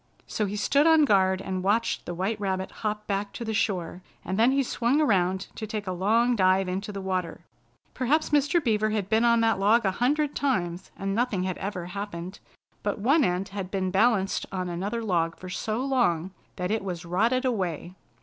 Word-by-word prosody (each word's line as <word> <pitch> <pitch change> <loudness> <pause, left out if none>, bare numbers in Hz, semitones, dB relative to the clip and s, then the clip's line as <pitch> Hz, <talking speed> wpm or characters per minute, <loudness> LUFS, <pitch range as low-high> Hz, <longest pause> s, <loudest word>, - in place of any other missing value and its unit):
So 210 - -2
he 200 - -4
stood 280 +8 +3
on 320 -2 +6
guard 190 -4 +3
and 185 -1 -3
watched 215 +4 0
the 175 - -4
white 200 +4 -2
rabbit 190 -1 -2
hop 210 -1 -4
back 200 0 -2
to 235 - -6
the 220 - -2
shore, 185 -4 -1 0.2
and 190 +4 -2
then 235 +3 +5
he 275 0 +2
swung 245 +3 +1
around 190 -9 +2
to 220 - -6
take 210 -1 -4
a 185 - -3
long 225 +7 +2
dive 190 -1 +3
into 195 +3 -3
the 200 - -6
water. 185 -3 -3 0.5
Perhaps 295 +6 +1
Mr. 295 +3 +2
Beaver 215 -3 +1
had 210 -3 -2
been 220 +2 +3
on 235 -1 +4
that 225 -3 +2
log 215 +3 +3
a 190 - +3
hundred 290 +7 0
times, 180 -10 -1
and 195 0 -2
nothing 225 -4 0
had 185 -1 -3
ever 190 -3 -4
happened; 185 -1 -6 0.4
but 205 - -2
one 280 +9 +3
end 180 -1 0
had 195 -2 -5
been 190 -1 -1
balanced 195 -1 +2
on 185 -2 -3
another 200 +7 -3
log 170 -5 0
for 185 - -9
so 220 +7 -2
long 190 -10 +1 0.2
that 180 +1 -3
it 220 -1 0
was 180 -3 -5
rotted 225 +9 +1
away. 185 - -2
200 Hz, 200 wpm, -26 LUFS, 185-235 Hz, 0.5 s, on